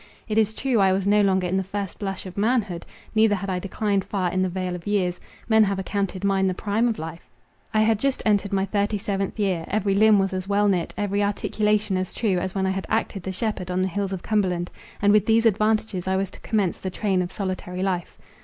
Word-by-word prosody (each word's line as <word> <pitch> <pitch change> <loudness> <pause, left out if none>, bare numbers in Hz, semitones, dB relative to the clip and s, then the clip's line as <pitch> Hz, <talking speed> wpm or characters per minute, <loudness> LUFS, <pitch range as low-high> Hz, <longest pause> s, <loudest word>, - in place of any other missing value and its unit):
It 215 0 +2
is 220 0 +1
true, 255 -1 +1
I 190 -1 +4
was 190 0 0
no 205 +1 +4
longer 190 -2 +2
in 180 +2 0
the 190 - 0
first 195 0 -5
blush 195 -2 -4
of 185 -1 -8
manhood; 205 -5 0 0.3
neither 220 -1 +4
had 195 0 -3
I 180 - -1
declined 200 +1 -1
far 185 -3 -1
in 185 - 0
the 185 - +1
vale 185 0 -3
of 180 +2 -7
years—men 205 +3 +1
have 200 -1 -1
accounted 195 0 -2
mine 195 -1 +2
the 185 - 0
prime 215 +5 0
of 230 - -1
life: 165 +1 -8 0.4
I 215 - +3
had 220 -1 +2
just 275 +1 0
entered 205 -2 +2
my 195 -1 +1
thirty 205 +1 0
seventh 195 0 -2
year; 185 -5 0
every 200 -1 0
limb 215 +1 +5
was 195 0 +1
as 185 0 -3
well 205 +1 +2
knit, 180 -4 +1
every 205 0 0
articulation 210 0 +1
as 185 0 -3
true, 195 -6 +1
as 185 +1 -4
when 190 -1 +1
I 190 - +1
had 190 0 -3
acted 220 -3 -1
the 190 - -4
shepherd 190 -2 -3
on 180 +1 0
the - - +1
hills 200 +1 -2
of 190 -2 -4
Cumberland; 185 -5 0 0.3
and 205 0 +5
with 210 -1 +4
these 225 +1 +4
advantages 215 -3 +1
I 190 - +1
was 195 0 -1
to - - -12
commence 205 -6 0
the 190 - -3
train 190 -1 0
of 180 0 -3
solitary 185 -2 -4
life. 180 -3 -2
195 Hz, 240 wpm, -24 LUFS, 185-210 Hz, 0.4 s, limb